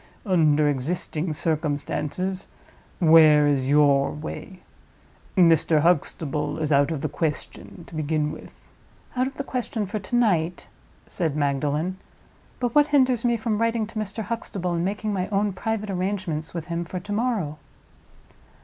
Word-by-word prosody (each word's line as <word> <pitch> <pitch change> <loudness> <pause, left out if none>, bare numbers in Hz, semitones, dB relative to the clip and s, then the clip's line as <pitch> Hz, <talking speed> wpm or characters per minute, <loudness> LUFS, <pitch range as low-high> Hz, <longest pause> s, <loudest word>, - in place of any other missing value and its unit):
Under 155 -6 +3
existing 155 +4 -2
circumstances, 160 +4 -2 0.5
where 155 -3 +7
is 135 -2 +1
your 140 -1 +4
way? 180 +4 -7 0.8
Mr. 165 -3 +5
Huxtable 150 -3 0
is 155 -1 -2
out 140 +1 +4
of 155 -4 -3
the - - 0
question, 155 +3 -4
to - - -16
begin 155 -1 -1
with." - - -10 0.6
"Out 255 +1 +1
of 270 - -8
the 280 - -2
question 245 -5 -3
for 210 +3 -4
to 205 +5 -4
night," 180 -8 +1 0.4
said 160 -6 -2
Magdalen; 150 +5 0 0.6
"but 245 -2 -1
what 295 0 +5
hinders 260 -5 +3
me 240 -1 +2
from 220 -1 -1
writing 230 -1 +1
to 220 0 -6
Mr. 215 +1 -4
Huxtable, 200 -5 -3
and 170 0 0
making 210 +3 -2
my 185 -1 -1
own 205 0 0
private 210 +2 -3
arrangements 185 -4 -2
with 170 -2 -5
him 170 0 -3
for 180 +2 -5
to 200 +3 -9
morrow?" 205 -10 -1
175 Hz, 150 wpm, -24 LUFS, 150-210 Hz, 0.8 s, where